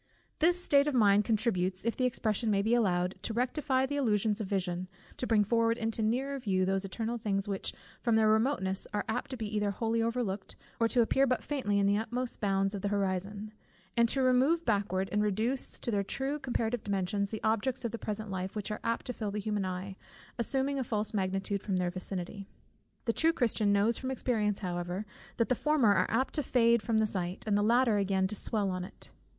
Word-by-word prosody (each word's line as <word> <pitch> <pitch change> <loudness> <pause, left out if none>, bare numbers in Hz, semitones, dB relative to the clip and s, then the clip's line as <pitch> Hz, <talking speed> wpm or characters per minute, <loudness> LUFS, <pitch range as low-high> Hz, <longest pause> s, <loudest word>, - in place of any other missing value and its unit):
This 350 +3 +4
state 285 -5 +4
of 295 - 0
mind 205 -3 +5
contributes, 200 -4 0
if 230 - 0
the 255 - 0
expression 225 -2 0
may 200 -1 +2
be 225 +3 +1
allowed, 180 -6 +2
to 220 - -3
rectify 260 +2 +1
the 285 +2 -3
illusions 220 -4 +1
of 205 - -3
vision, 185 -2 -2 0.3
to 250 - -2
bring 215 -2 +4
forward 230 +2 +2
into 225 -1 -1
nearer 265 +6 0
view 190 -6 +1
those 195 +1 0
eternal 225 +4 -3
things 195 -2 -1
which 195 -2 -2 0.3
from 235 -3 +2
their 220 -1 +4
remoteness 215 -4 +1
are 205 - -1
apt 225 +3 -2
to 260 - -5
be 215 -2 -4
either 210 -1 +1
wholly 225 +3 0
overlooked, 225 -4 -2 0.2
or 230 - +4
to 240 +1 +3
appear 270 +4 +3
but 255 -1 0
faintly 255 -9 -1
in 200 - +3
the 200 +1 +3
utmost 240 +2 -3
bounds 195 -1 +1
of 200 - -4
the 205 - -1
horizon; 200 +1 -2 0.4
and 235 -1 +4
to 270 +2 +1
remove 265 +7 +3
backward, 200 -4 0
and 210 - +1
reduce 220 +6 0
to 235 - -2
their 205 -2 +1
true 275 +8 -3
comparative 240 -3 -2
dimensions, 200 0 -1
the 220 -1 -5
objects 225 +4 0
of 230 - -1
the 230 - -5
present 215 0 -4
life, 185 +1 -4
which 210 0 -3
are 210 - -3
apt 230 0 -1
to 250 - -3
fill 215 -3 -4
the 205 - -4
human 205 -1 -1
eye, 185 +1 -4 0.4
assuming 270 +4 0
a - - 0
false 215 -2 -2
magnitude 195 0 -1
from 195 -3 -1
their 180 -1 0
vicinity. 185 +2 -5 0.6
The 230 - +1
true 325 +5 +3
Christian 225 -7 +1
knows 205 +3 +3
from 260 - -4
experience 220 -6 0
however, 175 +2 -3 0.3
that 230 - +1
the - - +4
former 265 -5 +3
are - - +1
apt 260 +4 0
to 300 - +1
fade 235 -3 +3
from 225 0 0
the 220 - +3
sight, 185 -3 -3
and 210 -2 +1
the 205 - +3
latter 230 +1 +3
again 195 -1 +1
to 195 - -1
swell 205 -1 +1
on 185 0 -3
it. 185 - -10
215 Hz, 215 wpm, -31 LUFS, 195-240 Hz, 0.6 s, mind